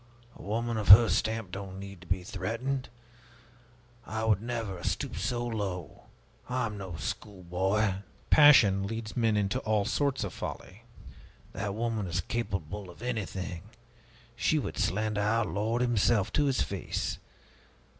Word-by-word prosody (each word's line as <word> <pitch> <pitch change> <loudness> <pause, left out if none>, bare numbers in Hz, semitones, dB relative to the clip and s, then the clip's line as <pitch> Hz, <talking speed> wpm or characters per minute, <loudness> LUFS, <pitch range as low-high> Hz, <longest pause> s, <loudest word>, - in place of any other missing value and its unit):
A - - -13
woman 115 +3 -2
of 105 - -3
her 110 +4 +10
stamp 110 -4 0
doesn't 95 -1 -6
need 100 -2 -9
to 90 - -14
be 90 0 -1
threatened! 115 +9 -3 1.1
I 110 0 -4
would 105 -3 +3
never 115 -5 -3
have 85 - -5
stooped - - -2
so 120 -1 -1
low! 100 - -4 0.4
I 125 0 0
am 105 -2 -4
no 95 -4 -6
schoolboy!" 95 +3 -1 0.3
"Passion 105 -10 +7
leads 110 0 -5
men 115 -3 +2
into 105 +5 0
all 110 -4 +1
sorts 140 -2 0
of 100 - -4
folly." 105 +6 -7 0.7
"That 100 0 -3
woman 110 -3 -1
is 85 +1 -1
capable 100 -2 -4
of 90 +6 -12
anything! 95 -7 -3 0.7
She 155 +6 +2
would 145 - -3
slander 105 +3 0
our 110 +2 +2
Lord 110 +5 0
himself 115 -3 +2
to 145 - +3
His 130 - +2
face! - - -3
105 Hz, 145 wpm, -29 LUFS, 95-115 Hz, 1.1 s, her